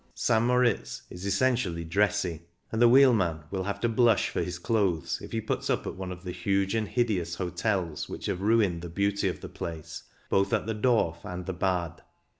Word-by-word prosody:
St. 110 -1 +2
Moritz 120 - +1
is 90 +2 -6
essentially 100 -5 +1
"dressy," 90 -2 0 0.3
and 110 - -1
the 120 - +7
wheelman 115 - +5
will 95 -1 -2
have 100 0 -3
to 120 - +2
blush 115 -1 +3
for - - -2
his 90 -1 -3
clothes 85 -5 0
if - - -9
he 115 - -1
puts 110 - -3
up - - 0
at - - -4
one 95 -1 -6
of 90 0 -8
the 90 - -4
huge 95 +2 0
and 110 -2 0
hid 120 +2 +1
eous 85 -3 -2
hotels 90 -2 -2
which - - -6
have 90 - -2
ruined 100 -5 +2
the 85 - -6
beauty 100 +3 0
of - - -3
the - - -6
place, 80 -2 -7 0.3
both 100 0 +1
at - - +1
the 110 - -2
Dorf 105 -7 +1
and 90 0 -6
the 95 - -3
Bad. 90 -3 -1
95 Hz, 210 wpm, -28 LUFS, 85-110 Hz, 0.3 s, the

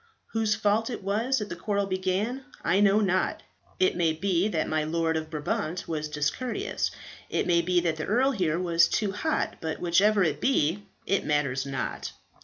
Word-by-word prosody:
Whose 220 -2 +2
fault 215 +2 +1
it 230 -5 -5
was 225 +7 +1
that 210 -3 -3
the - - -4
quarrel 200 +3 -1
began 195 +7 -1 0.2
I 185 +4 +2
know 205 +1 +5
not. 185 -2 0 0.4
It 185 - +3
may 165 -2 +2
be 185 +2 +1
that 165 -7 -1
my 155 -1 0
Lord 160 +1 0
of 160 0 -3
Brabant 155 +3 -3
was 155 -2 -2
discourteous. 150 - -2 0.4
It - - 0
may 170 -1 +3
be 175 +1 +2
that 165 -2 -1
the 155 - -3
earl 255 +6 +3
here 175 - 0
was 170 -2 +3
too 210 -3 0
hot. 310 +11 -1
But 160 -1 -3
whichever 195 +4 +3
it 150 -3 -1
be, 200 - +1 0.2
it 195 - +1
matters 140 -3 0
not." 135 - -4
185 Hz, 185 wpm, -27 LUFS, 160-210 Hz, 0.4 s, know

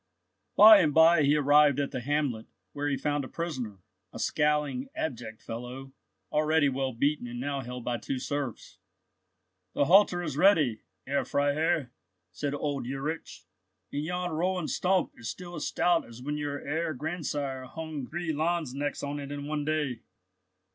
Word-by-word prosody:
By 215 0 +10
and 150 -4 +2
by 160 0 +7
he 145 +1 +4
arrived 145 -1 +5
at 140 - -1
the 130 - -3
hamlet, 135 -4 -1 0.3
where 145 0 -2
he 140 - 0
found 145 0 -1
a - - -6
prisoner, 125 - -5 0.3
a - - -9
scowling, 150 -3 0
abject 120 -7 -5
fellow, 125 +3 -7 0.4
already 155 -1 +3
well 135 0 -1
beaten, 140 +2 0
and 120 0 -6
now 140 +1 -2
held 125 -1 -7
by 120 -1 -1
two 135 +4 -3
serfs. 140 -2 -4 0.9
"The 145 - +2
halter 180 0 +5
is 150 -5 -4
ready, 155 - +4 0.2
Herr 140 +1 0
Freiherr," 145 0 0 0.4
said 145 -1 -3
old 145 -4 -3
Ulrich, 135 +5 -5 0.5
"and 145 - -1
yon 180 +2 -2
rowan 175 +1 -1
stump 185 0 +1
is 115 -2 -6
still 175 +4 -7
as 155 -3 -3
stout 175 -1 +2
as 115 0 -12
when 145 +4 -3
your 145 -1 -3
Herr 160 +1 -1
grandsire 145 -3 -3
hung 150 0 -6
three 170 -1 -3
lanzknechts 150 -3 -1
on 145 +1 -3
it 140 0 -7
in 145 0 -5
one 150 0 -2
day. 150 -6 -1
145 Hz, 160 wpm, -29 LUFS, 135-160 Hz, 0.9 s, By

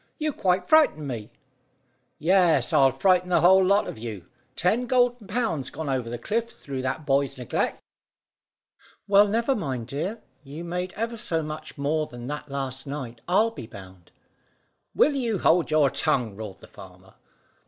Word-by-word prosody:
"You 305 -2 -1
quite 180 -3 0
frightened 295 - +4
me." 115 -4 -5 0.9
"Yes, 170 -6 +3
I'll 135 -1 +6
frighten 180 +4 +2
the 180 - +3
whole 190 +2 +6
lot 200 +3 +3
of - - -7
you. 110 -6 -7 0.3
Ten 225 +9 +1
golden 245 -4 +2
pounds 185 - -1
gone 160 -3 -5
over 130 -3 -1
the 120 - -4
cliff 230 - -2
through 135 - -7
that 135 +4 -3
boy's 140 0 +1
neglect." 125 -2 -2 1.3
"Well, 205 +1 +6
never 230 +6 +1
mind, 130 - -3
dear. 165 - -4 0.2
You 145 +4 -8
made 180 +1 -3
ever 230 +2 -3
so 165 -6 -1
much 155 +1 -7
more 150 +2 0
than 120 -1 -9
that 150 +2 -6
last 135 0 -4
night, 130 -5 -6
I'll 215 +6 +3
be 125 - -9
bound!" 95 -5 -13 0.9
"Will 300 - +4
you 235 -6 -1
hold 170 0 +3
your 155 -3 +3
tongue?" 115 -6 0
roared 100 -2 -8
the - - -13
farmer. 95 0 -15
155 Hz, 165 wpm, -25 LUFS, 130-195 Hz, 1.3 s, I'll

